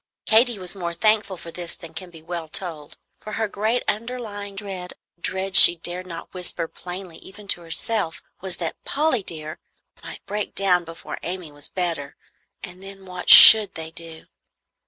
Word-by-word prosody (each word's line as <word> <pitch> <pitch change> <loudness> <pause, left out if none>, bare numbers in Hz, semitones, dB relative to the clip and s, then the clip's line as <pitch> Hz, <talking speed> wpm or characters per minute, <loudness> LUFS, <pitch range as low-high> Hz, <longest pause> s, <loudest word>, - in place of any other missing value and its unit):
Katy 230 +1 +3
was 180 -2 -5
more 170 -3 -6
thankful 215 -1 0
for 165 - -11
this 175 0 -7
than 165 -1 -13
can 175 +2 -9
well 170 -2 -6
be - - -34
told; 160 -6 -4 0.2
for 215 - -10
her 220 0 -2
great 215 +4 -2
underlying 210 -3 -5
dread 195 -3 -8 0.2
a 170 - -40
dread 190 +1 -3
she 175 - +10
dared 175 +2 -7
not 170 -1 -10
whisper 180 -2 -3
plainly 180 -1 -10
even 205 +1 -14
to 175 - -1
herself 170 +1 -2 0.2
was 190 -2 -3
that 165 -2 -6
"Polly 290 -5 0
dear" 155 -3 -8 0.4
might - - -11
break 210 +1 -5
down 180 -3 +1
before 165 0 -9
Amy 175 -2 -7
was 145 0 -9
better, 165 -6 -4 0.5
and 180 -1 -11
then 195 0 -12
what 180 -1 -7
should 215 -3 +10
they 160 0 -8
do? 165 -1 -10
180 Hz, 175 wpm, -22 LUFS, 170-205 Hz, 0.5 s, she